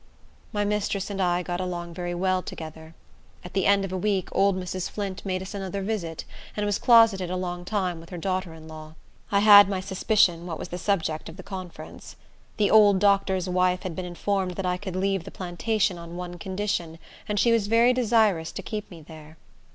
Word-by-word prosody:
My 205 -1 0
mistress 205 -1 -1
and 195 -1 -3
I 175 -1 +1
got 175 +1 -3
along 175 -2 -4
very 175 0 -4
well 185 +1 +1
together. 160 -1 -9 0.5
At 180 - -9
the 195 -1 +1
end 200 0 +4
of 190 - -6
a - - -1
week, 195 -1 0
old 195 -1 +2
Mrs. 185 0 -4
Flint 200 -2 -5
made 185 -1 -2
us 190 - -8
another 195 0 -4
visit, 185 -6 -3 0.3
and 210 - 0
was 205 -1 0
closeted 225 -6 +5
a 185 - -2
long 175 -1 -4
time 185 -4 -1
with 165 - -13
her 180 - -7
daughter 185 0 -2
in 160 0 -13
law. 155 0 -10 0.4
I 200 0 +3
had 205 -1 +9
my 195 -2 -1
suspicions 190 -2 +2
what 165 -3 -5
was - - -7
the 180 - -5
subject 165 -6 -1
of 160 - -11
the - - -9
conference. 185 -3 -9 0.4
The 205 -2 +2
old 210 -2 +7
doctor's 195 -2 +2
wife 180 0 +1
had 180 -4 -5
been 185 - -4
informed 185 +1 -2
that 195 - -3
I 180 0 0
could 190 -1 -6
leave 195 -1 0
the - - -9
plantation 190 +1 -1
on 170 0 -9
one 175 -1 -6
condition, 185 -4 -3 0.3
and 205 -1 0
she 235 +4 +4
was 225 -3 +2
very 230 +3 +4
desirous 220 -9 +2
to - - -6
keep 210 -2 -5
me 165 -3 -12
there. 155 0 -13
185 Hz, 210 wpm, -26 LUFS, 175-200 Hz, 0.5 s, had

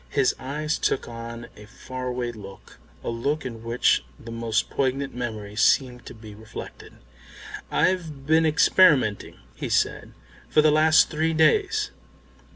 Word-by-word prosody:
His 140 -3 +2
eyes 150 +4 -3
took - - -1
on 115 0 -8
a 105 0 -13
faraway 125 +1 -5
look, 100 -4 -13 0.2
a - - -3
look 140 +7 -2
in 115 -3 -7
which 115 - +2 0.2
the 115 - -10
most 115 -2 -1
poignant 135 +1 -1
memories 110 -3 -4
seem 125 -3 +3
to 120 - -12
be 110 -1 -12
reflected. 110 +1 -10 0.8
"I've 160 -7 -1
been 160 +2 +4
experimenting," 150 - +3 0.2
he - - -6
said, - - 0 0.4
"for 155 - +4
the 155 - +5
last 155 +1 +4
three 160 +1 0
days." 420 - +2
125 Hz, 140 wpm, -24 LUFS, 115-155 Hz, 0.8 s, the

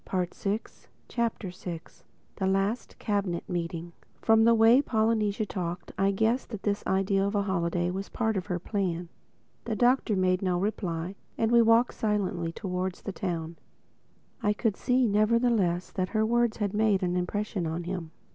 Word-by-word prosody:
THE 185 -2 0
SIXTH 205 +3 -4 0.2
CHAPTER 230 -5 -1 0.9
THE 190 - 0
LAST 195 +5 0
CABINET 200 -5 -1
MEETING 170 -1 -4 0.3
FROM 225 0 +4
the 230 0 +6
way 225 +4 +6
Polynesia 220 -4 +1
talked, 175 -3 -4
I 195 +1 +2
guessed 220 +6 +1
that 215 -4 -7
this 205 -1 0
idea 195 0 +2
of 200 +2 -1
a 200 - +2
holiday 175 -2 0
was 195 +2 -5
part 220 -1 0
of 185 -1 -3
her 180 -3 -1
plan. 180 -2 -2 0.6
The 225 -2 -1
Doctor 245 -1 +3
made 185 -1 +2
no 185 -2 +1
reply; 180 -3 -2 0.2
and 225 0 +1
we 235 0 +7
walked 230 +2 +4
on - - -20
silently 195 -6 0
towards 180 +1 -4
the - - -3
town. 170 -3 -4 0.8
I 210 - +2
could 215 -1 0
see, 255 0 +2
nevertheless 215 -4 +2
that 185 -1 -2
her 220 - +3
words 235 0 +2
had 205 -2 -1
made 210 -3 +2
an 180 0 0
impression 185 0 -2
on 165 +2 -3
him. 175 -2 -4
200 Hz, 165 wpm, -28 LUFS, 180-220 Hz, 0.9 s, we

